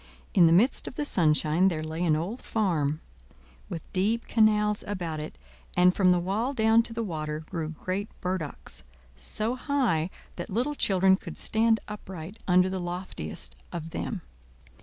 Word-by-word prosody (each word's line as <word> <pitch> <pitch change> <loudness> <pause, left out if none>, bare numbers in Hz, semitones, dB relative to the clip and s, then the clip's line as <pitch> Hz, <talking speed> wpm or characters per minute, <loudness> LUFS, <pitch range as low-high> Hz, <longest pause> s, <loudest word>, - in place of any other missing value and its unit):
In 175 -3 +7
the - - +4
midst 215 +11 +4
of - - -6
the 295 - -2
sunshine 160 - +3
there 160 -4 0
lay 160 +2 -3
an 160 -3 +3
old 185 +11 -3
farm, 160 -8 0 0.7
with 170 -4 -5
deep 215 +5 +1
canals 210 -2 +3
about 175 -6 -3
it, 150 - -7 0.4
and 180 0 +6
from 185 -2 +4
the 180 - +5
wall 210 +10 -1
down 220 0 +5
to 230 - -7
the 230 0 -2
water 155 -5 -3
grew 160 -1 -4
great 185 +5 -3
burdocks, 180 - -4 0.3
so 215 - -1
high 250 - +1 0.3
that 175 - -5
little 245 +9 0
children 190 -7 +3
could - - -9
stand 225 0 +3
upright 190 -2 -8
under 180 0 +5
the 190 0 -2
loftiest 175 - -5 0.2
of 165 -1 -5
them. 185 -1 -4
185 Hz, 160 wpm, -28 LUFS, 160-215 Hz, 0.7 s, In